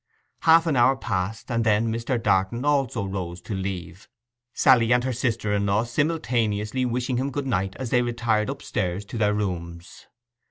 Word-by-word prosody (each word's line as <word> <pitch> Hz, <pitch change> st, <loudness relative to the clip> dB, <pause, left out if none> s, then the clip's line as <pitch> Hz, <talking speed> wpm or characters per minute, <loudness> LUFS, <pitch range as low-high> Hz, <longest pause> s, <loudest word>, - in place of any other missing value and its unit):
Half 165 Hz, +1 st, +5 dB
an 160 Hz, -4 st, +1 dB
hour 130 Hz, +2 st, +4 dB
passed, 110 Hz, -2 st, -3 dB
and 115 Hz, -1 st, +1 dB
then 110 Hz, +1 st, +2 dB
Mr. 115 Hz, +3 st, -1 dB
Darton 105 Hz, +4 st, +1 dB
also 135 Hz, -7 st, +1 dB
rose 90 Hz, -3 st, -5 dB
to 105 Hz, -, -6 dB
leave, 95 Hz, -2 st, -5 dB, 0.4 s
Sally 125 Hz, -4 st, +4 dB
and 125 Hz, 0 st, +4 dB
her 130 Hz, 0 st, -1 dB
sister 115 Hz, -4 st, -1 dB
in 100 Hz, 0 st, 0 dB
law 100 Hz, +3 st, +2 dB
simultaneously 120 Hz, -4 st, -1 dB
wishing 125 Hz, +1 st, -1 dB
him 135 Hz, +2 st, -1 dB
good 140 Hz, 0 st, -4 dB
night 95 Hz, -7 st, -1 dB
as 130 Hz, -3 st, -5 dB
they 125 Hz, -, +4 dB
retired 115 Hz, -3 st, 0 dB
upstairs 90 Hz, +3 st, -3 dB
to 115 Hz, -, -6 dB
their 105 Hz, -1 st, +2 dB
rooms. 85 Hz, -3 st, -5 dB
115 Hz, 170 wpm, -24 LUFS, 100-125 Hz, 0.4 s, Half